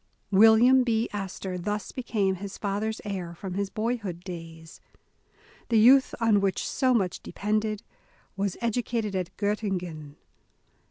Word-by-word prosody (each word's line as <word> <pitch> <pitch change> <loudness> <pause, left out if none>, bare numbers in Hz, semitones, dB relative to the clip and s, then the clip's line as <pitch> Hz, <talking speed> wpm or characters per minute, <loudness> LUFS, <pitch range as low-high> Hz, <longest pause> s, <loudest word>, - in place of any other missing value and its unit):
Wil 220 +3 +7
liam 255 +3 +6
B. 230 -1 +1
Astor 190 -2 -4
thus 205 +2 -3
became 215 -6 -1
his 195 +1 -7
father's 210 +2 -2
heir 180 -4 -4
from 185 +1 -6
his 200 +1 -2
boyhood 215 -5 -3
days. 165 -3 -9 0.9
The 230 - +3
youth 260 +5 +6
on 220 -3 +3
which 195 -2 0
so 260 -2 +2
much 190 -5 0
depended, 215 +1 -2 0.5
was 195 -1 -2
educated 230 -3 -1
at 185 -2 -2
Gottingen. 180 -8 -3
205 Hz, 130 wpm, -27 LUFS, 185-225 Hz, 0.9 s, Wil